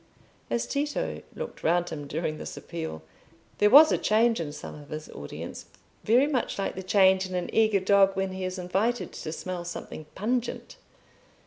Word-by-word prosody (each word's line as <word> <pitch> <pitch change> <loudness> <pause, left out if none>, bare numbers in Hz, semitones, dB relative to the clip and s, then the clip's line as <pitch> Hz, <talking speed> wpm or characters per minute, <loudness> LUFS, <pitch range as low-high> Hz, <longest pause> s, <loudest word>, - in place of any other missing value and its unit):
As 235 - 0
Tito 290 +1 -2
looked 485 0 -7
round 175 +1 +2
him 145 -2 -6
during 155 +1 -3
this - - -7
appeal, 160 - -6 0.6
there 210 - +5
was 300 +6 +9
a - - +2
change 225 +2 +3
in 155 -3 -3
some 150 - -8
of 145 -1 -12
his 155 0 -6
audience 70 - -8 0.4
very 245 +5 +4
much 280 -5 -1
like 195 - -2
the 190 - -6
change 190 0 +4
in 185 - -5
an 180 - -3
eager 215 -2 +4
dog 195 0 +4
when 190 0 -1
he 190 0 -5
is 185 +1 -3
invited 195 +7 -1
to 155 - -6
smell 180 +2 -5
something 165 -3 -7
pungent. 240 - -2
190 Hz, 180 wpm, -27 LUFS, 170-225 Hz, 0.6 s, was